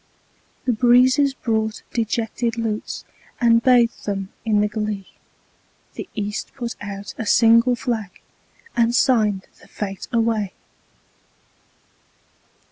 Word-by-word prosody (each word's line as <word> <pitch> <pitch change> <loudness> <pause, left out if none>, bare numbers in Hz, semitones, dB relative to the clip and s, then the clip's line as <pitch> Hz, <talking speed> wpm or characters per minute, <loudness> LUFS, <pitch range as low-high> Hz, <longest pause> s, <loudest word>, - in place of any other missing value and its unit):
The 255 - +2
breezes 255 +4 +4
brought 220 -3 -2
dejected 230 +1 -1
lutes, 220 -2 -3 0.3
And 230 -2 +4
bathed 240 -3 +3
them 195 -1 -2
in 215 -2 +2
the 210 - +2
glee; 210 -2 -3 0.9
The - - -7
East 210 -1 -4
put 240 -3 -4
out 200 -1 -6
a 225 - -2
single 230 +3 +5
flag, 230 -4 -2 0.7
And 235 0 +2
signed 215 -7 +2 0.2
the - - -17
fete 195 -2 -6
away. 225 -4 0
225 Hz, 110 wpm, -22 LUFS, 210-240 Hz, 0.9 s, single